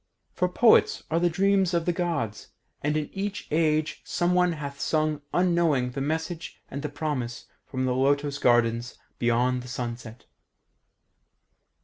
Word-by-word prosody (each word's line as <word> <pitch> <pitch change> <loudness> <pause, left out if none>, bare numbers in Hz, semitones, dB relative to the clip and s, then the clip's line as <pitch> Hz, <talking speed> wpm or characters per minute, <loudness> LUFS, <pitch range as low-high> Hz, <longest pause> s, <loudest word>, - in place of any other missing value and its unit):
For 180 0 0
poets 225 +6 +4
are 165 - +2
the 175 0 +3
dreams 190 0 +2
of 170 -1 0
the 175 - +1
Gods, 165 - -2 0.3
and 150 +1 0
in 150 -1 -3
each 200 +1 -4
age 155 -1 +1
someone 180 0 +2
hath 140 -3 -6
sung 155 -1 0
unknowing 170 -8 +2
the 135 - -4
message 160 +3 -3
and 140 - -4
the 150 - -3
promise 145 -5 -3 0.2
from 130 -1 -2
the 125 - +1
lotos 140 +2 +1
gardens 120 -1 +2 0.2
beyond 125 +1 +2
the 125 - -10
sunset." 120 -1 -6
150 Hz, 140 wpm, -26 LUFS, 125-170 Hz, 0.3 s, poets